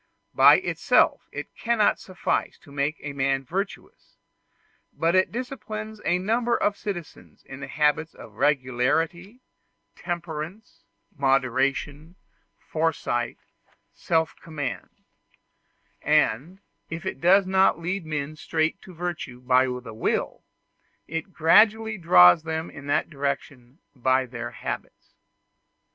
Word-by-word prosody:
By - - +8
itself - - +1
it - - -8
cannot 230 -3 +2
suffice 185 -1 -2
to 145 - -16
make 145 +2 -1
a 145 0 -6
man 135 -1 0
virtuous, 195 +9 -6 0.7
but 165 +1 0
it 185 0 +3
disciplines 220 -4 -6
a 175 - +2
number 230 +5 +1
of 205 - +1
citizens 175 -8 -8
in 135 +1 -10
habits 150 +2 0
of - - -12
regularity, 150 - 0 0.5
temperance, 175 +3 -6 0.3
moderation, 135 +3 0 0.4
foresight, 155 -7 -2 0.6
self 160 -1 0
command; 145 -6 -5 1.1
and, 165 - +1 0.3
if 165 0 -6
it - - -4
does 190 +3 +5
not 190 -2 +3
lead 180 +3 -3
men 155 -1 -4
straight 160 +3 -1
to 185 - -13
virtue 165 -7 -5
by 125 +1 +3
the 125 -3 -6
will, 110 - -2 0.6
it 165 +4 -5
gradually 215 +6 +4
draws 90 - +7
them 160 +1 -4
in 145 -1 -11
that 145 - 0
direction 140 -2 -4 0.2
by 130 +1 +2
their 120 -1 -6
habits. - - -7
160 Hz, 115 wpm, -25 LUFS, 135-185 Hz, 1.1 s, By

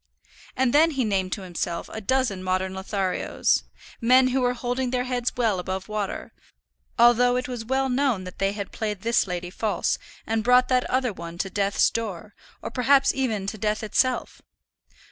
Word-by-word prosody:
And 255 -1 +2
then 315 +3 +6
he 270 -6 -1
named 190 -3 0
to 200 - -5
himself 175 -1 -4
a 220 - -5
dozen 235 -3 0
modern 185 0 -1
Lotharios, 190 -1 0 0.4
men 255 +2 +5
who 260 +1 +1
were 245 0 +1
holding 245 +1 -2
their 250 0 0
heads 250 -1 -1
well 220 -6 +1
above 185 +1 -4
water, 210 -2 -4 0.6
although 240 +1 +5
it 250 0 -1
was 245 -3 -5
known 265 -3 +1
that 180 0 -10
they 195 0 +1
had 200 -2 -6
played 210 -3 -3
this 235 -1 +2
lady 175 -1 -4
false, 215 +2 -1 0.3
and 225 0 -1
brought 250 +1 +4
that 255 -1 +2
other 255 -3 +1
one 170 -1 -8
to 190 +2 -3
death's 200 -1 +2
door, 210 -3 -5 0.3
or - - -5
perhaps 270 +2 +3
even 225 -7 -1
to 210 +2 -5
death 215 +1 -1
itself. 255 +4 0
225 Hz, 175 wpm, -25 LUFS, 195-250 Hz, 0.6 s, then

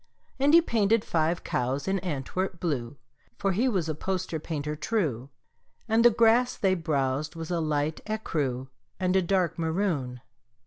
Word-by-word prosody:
And 285 +4 +5
he 335 - +7
painted 225 -4 +2
five 165 +1 0
cows 130 +5 -1
in 195 0 +1
Antwerp 175 +2 -3
blue 140 -6 -2 0.4
(For 195 - 0
he 230 +8 +2
was 185 -8 0
a 155 - -1
poster 185 0 -3
painter 150 -1 -4
true), 150 - -1 0.6
And 225 +1 +3
the 240 - +9
grass 235 +2 +3
they 190 -2 +2
browsed 150 -3 -1
was 165 +1 -6
a 175 - 0
light 155 -1 -1
écru 140 - -2 0.3
And 185 0 +1
a 190 - +5
dark 180 -2 0
maroon. 160 -8 -1
170 Hz, 160 wpm, -27 LUFS, 145-195 Hz, 0.6 s, the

